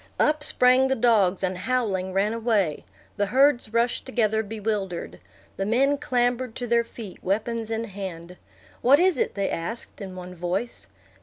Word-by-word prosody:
Up 300 0 +2
sprang 255 0 +5
the 265 - +1
dogs, 210 -6 +2
and, 185 0 0
howling, 190 -3 -1
ran 200 +3 +1
away. 220 -9 0 0.3
The 205 - +1
herds 260 -2 +3
rushed 235 +1 0
together 220 -4 0
bewildered. 200 - -4 0.4
The 195 - -1
men 275 +5 +2
clambered 245 -2 0
to 245 - -4
their 235 0 +2
feet, 220 -4 -11
weapons 225 +3 -2
in 225 0 -2
hand. 180 -4 -7 0.4
"What 275 +4 +5
is 360 -6 +3
it?" - - -1
they 200 -1 -1
asked, 215 +7 -5
in 190 -2 -7
one 180 0 -8
voice. 180 +7 -4
220 Hz, 160 wpm, -25 LUFS, 190-245 Hz, 0.4 s, sprang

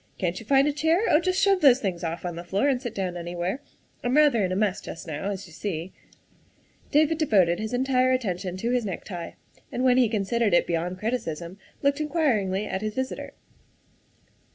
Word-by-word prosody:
" - - -38
Can't 180 -1 -2
you 225 - -12
find 275 +1 +4
a 295 - +1
chair? 320 +5 +2
Oh, 300 - +6
just 370 +2 0
shove 390 -2 +3
those 265 -3 +6
things 185 -7 -3
off 165 +1 -4
on 175 -1 -3
the 170 - -6
floor 195 +9 0
and 260 -3 +1
sit 240 -4 -5
down 185 -2 -2
anywhere. 175 +7 -3 0.4
I'm 245 +4 +1
rather 290 -8 +5
in 185 - 0
a - - 0
mess 200 -1 0
just 165 - -8
now, 160 +4 -4
as 200 -1 -5
you 170 - -15
see. 175 -1 -4 0.3
' - - -35
' - - -35 0.3
David 310 +2 +3
devoted 190 - +3
his 220 0 -3
entire 255 0 +2
attention 185 -7 -2
to 230 +5 -1
his 250 -1 +1
necktie, 180 -3 -6 0.4
and 250 - -2
when 255 -1 +4
he 250 -3 +4
considered 215 -1 +1
it - - +4
beyond 175 +2 -2
criticism 185 -5 -4 0.2
looked 280 +2 +2
in 305 - -2
quiringly 215 - +1
at 190 - -3
his 215 0 -3
visitor. 260 0 -4
215 Hz, 215 wpm, -26 LUFS, 180-260 Hz, 0.4 s, Oh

